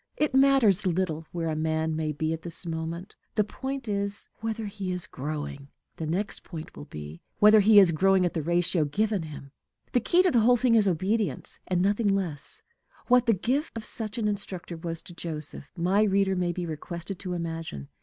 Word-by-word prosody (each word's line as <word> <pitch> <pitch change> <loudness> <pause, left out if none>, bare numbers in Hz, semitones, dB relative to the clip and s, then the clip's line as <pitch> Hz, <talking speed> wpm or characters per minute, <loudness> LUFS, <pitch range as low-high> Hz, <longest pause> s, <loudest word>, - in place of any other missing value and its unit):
It 300 -2 +1
matters 265 -9 +4
little 165 -3 -1
where 170 -1 -3
a - - -2
man 160 0 -1
may 155 -1 -1
be 155 +2 -2
at 165 - -5
this 170 +1 +3
moment; 165 +3 -5 0.2
the 210 - +3
point 265 +4 -5
is 200 -1 -2
whether 225 0 -3
he 195 -2 -4
is 180 -1 -4
growing. 145 0 -6 0.3
The 160 - -4
next 195 +5 -2
point 160 -3 -9
will - - -9
be, 75 - -9 0.2
whether 210 +1 +7
he 210 +1 +6
is 190 -4 +8
growing 190 +3 +3
at 175 - -1
the 160 - -1
ratio 175 +1 +1
given 205 +6 0
him. 145 -3 -9 0.4
The 245 - +3
key 345 +10 +3
to 365 - +3
the 240 - +4
whole 245 +3 +5
thing 245 0 +2
is 215 -3 +4
obedience, 195 +5 0
and 180 -1 +1
nothing 205 0 +2
else. 165 -7 -5 0.5
What 250 0 +5
the 230 - +5
gift 255 - -1
of 220 - -6
such 215 0 +2
an 220 -2 0
instructor 190 -4 -4
was 165 0 -5
to 175 - -10
Joseph, 155 -4 -4
my 185 +4 +2
reader 195 -2 +2
may 180 -1 0
be 175 0 -4
requested 170 +3 -5
to 185 -2 -3
imagine. 165 - -5
185 Hz, 200 wpm, -27 LUFS, 160-210 Hz, 0.5 s, is